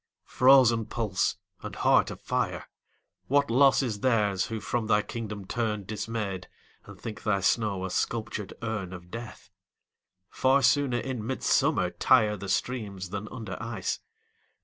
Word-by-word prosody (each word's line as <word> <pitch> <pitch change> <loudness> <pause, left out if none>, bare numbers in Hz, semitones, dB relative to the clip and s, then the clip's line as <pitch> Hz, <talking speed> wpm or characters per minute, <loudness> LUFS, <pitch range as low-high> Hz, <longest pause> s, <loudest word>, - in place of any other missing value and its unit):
frozen 125 -3 +5
pulse 105 -4 -1 0.2
and - - -7
heart - - +3
of - - -8
fire, - - -2 0.6
What 140 -1 +2
loss 135 +2 +5
is 110 -5 -3
theirs 105 -6 +1
who 110 -1 -4
from 115 0 -2
thy 105 -1 +3
kingdom 105 -4 -6
turn 105 -1 -2
Dismayed, 105 -3 -4 0.4
and - - -12
think 110 -2 -7
thy 100 -2 +1
snow 100 -2 +1
a 95 - -5
sculptured 110 -3 -2
urn 105 -5 -3
Of 90 0 -11
death! 115 0 -9 0.8
Far 135 +1 +3
sooner 140 -4 +3
in 125 -2 -4
midsummer 110 -6 +1
tire 110 -5 +3
The 100 -1 -7
streams 100 -4 -2
than 100 +1 -4
under 115 -4 -7
ice. 115 -5 -3
110 Hz, 145 wpm, -28 LUFS, 100-120 Hz, 0.8 s, frozen